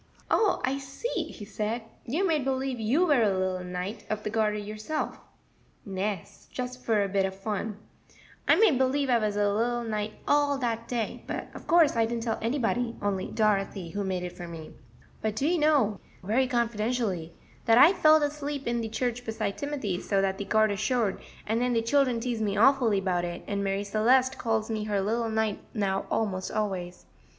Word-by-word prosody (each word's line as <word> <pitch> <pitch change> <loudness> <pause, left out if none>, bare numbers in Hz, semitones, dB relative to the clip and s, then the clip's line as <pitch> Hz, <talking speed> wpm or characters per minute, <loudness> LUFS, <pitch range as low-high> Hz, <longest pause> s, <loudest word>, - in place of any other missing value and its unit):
"Oh, 420 -4 +3
I 270 +2 -1
see," 275 - -3
he 205 - -9
said; 215 +3 -3 0.2
"you 320 +11 0
made 310 -5 +1
believe 265 -1 -1
you 255 +11 +2
were 290 -7 +4
a 215 - +4
little 185 -1 -1
Knight 180 +4 -5
of 215 0 -2
the 210 - -3
Garter 215 -1 +1
yourself." 215 +8 -4 0.7
"Nes; 195 -1 -4
just 250 0 -5
for 215 -3 +2
a - - -1
bit 195 0 +1
of 190 0 -2
fun, 210 +1 -3 0.7
I - - +7
made 395 - +4
believe 265 +1 +2
I 240 - +4
was 210 -2 -1
a 205 -1 +2
little 240 +3 0
knight 215 -1 -3
all 290 -1 +3
dat 230 -3 -2
day; 235 -3 -3
but - - -4
of - - -11
course 330 -5 +5
I 225 -1 +3
didn't 230 0 -3
tell 225 -2 -1
anybody, 235 0 0
only 200 -2 -1
Dorothy, 195 -4 0
who 205 0 -2
made 185 -2 -2
it 180 - -4
for 175 - -7
me. 165 -2 -8 0.5
But 215 -1 -1
do 270 +7 0
you 345 +1 +2
know," 280 -10 +3 0.2
very 235 +7 +2
confidentially, 225 - -1 0.3
"dat 225 0 +6
I 310 +9 +8
felled 310 -4 +5
asleep 290 -1 -3
in 235 0 0
de 225 - -3
church 245 +2 -2
beside 220 -3 -3
Timothy, 265 -11 -2
so 195 - 0
dat 195 0 0
de 200 - -3
garter 215 -1 +2
showed, 215 -1 0 0.3
and 220 +2 0
den 250 0 +1
de 230 - +2
children 255 -1 +2
teased 235 -1 -2
me 205 -2 0
awfully 230 -4 +4
'bout 180 -2 0
it, 175 0 -5
and 200 -1 -2
Marie 195 0 -1
Celeste 250 +6 +2
calls 225 -1 0
me 215 -1 -2
her 205 -2 0
little 225 +4 0
knight 220 -2 0 0.2
now 195 -2 0
almost 190 -4 -1
always. 190 -4 -3
220 Hz, 195 wpm, -28 LUFS, 200-255 Hz, 0.7 s, I